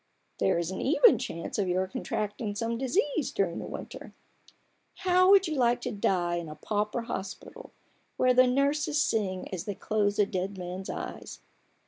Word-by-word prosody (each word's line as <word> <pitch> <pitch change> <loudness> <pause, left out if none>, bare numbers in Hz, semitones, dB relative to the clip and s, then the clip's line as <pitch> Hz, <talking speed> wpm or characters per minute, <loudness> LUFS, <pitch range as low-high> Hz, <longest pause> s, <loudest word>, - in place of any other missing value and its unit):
There 100 - +2
is 170 +1 -2
an 190 - -4
even 350 - +5
chance 190 -6 -4
of 195 - +1
your 185 +1 +1
contracting 210 +1 -3
some 230 +2 -2
disease 285 - 0
during 175 -4 -1
the - - -6
winter. - - -8 0.9
How 365 0 +5
would 390 -1 +6
you 315 - -2
like 245 -2 +2
to - - -3
die 180 -4 0
in 170 -2 -5
a 155 - -8
pauper 210 +7 -2
hospital, 230 - -7 0.5
where 255 0 +4
the 255 0 +6
nurses 285 +3 +1
sing 195 -9 0
as 180 - -4
they 205 - -4
close 205 -1 0
a 205 - +4
dead 190 0 -3
man's 185 +1 -6
eyes - - -6
210 Hz, 170 wpm, -28 LUFS, 185-260 Hz, 0.9 s, would